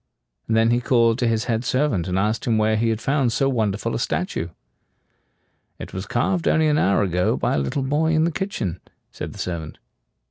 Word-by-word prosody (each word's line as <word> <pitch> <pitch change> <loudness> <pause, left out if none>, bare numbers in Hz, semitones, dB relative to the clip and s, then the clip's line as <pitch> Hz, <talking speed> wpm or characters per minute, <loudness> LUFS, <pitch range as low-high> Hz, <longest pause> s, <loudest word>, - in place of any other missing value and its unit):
And 110 - +1
then 115 +1 +4
he 120 +1 +2
called 115 -1 +3
to 120 - +1
his 110 -1 +1
head 115 0 -1
servant, 125 - 0
and 90 0 -1
asked 105 +3 0
him 115 -2 +2
where 110 0 +2
he 115 +1 +1
had 110 -1 -1
found 135 0 +1
so 135 +4 +1
wonderful 110 -3 -1
a - - -1
statue. 85 -4 -2 1.3
"It - - -9
was 95 +2 -5
carved 170 +10 0
only 160 0 +3
an 150 0 +2
hour 100 +2 +3
ago 90 -1 +1
by - - 0
a - - +1
little 70 - -2
boy 150 +4 +1
in 155 0 +3
the 170 - +1
kitchen," 115 - -3 0.3
said - - -6
the - - -12
servant. 80 -4 -5
115 Hz, 210 wpm, -22 LUFS, 100-135 Hz, 1.3 s, then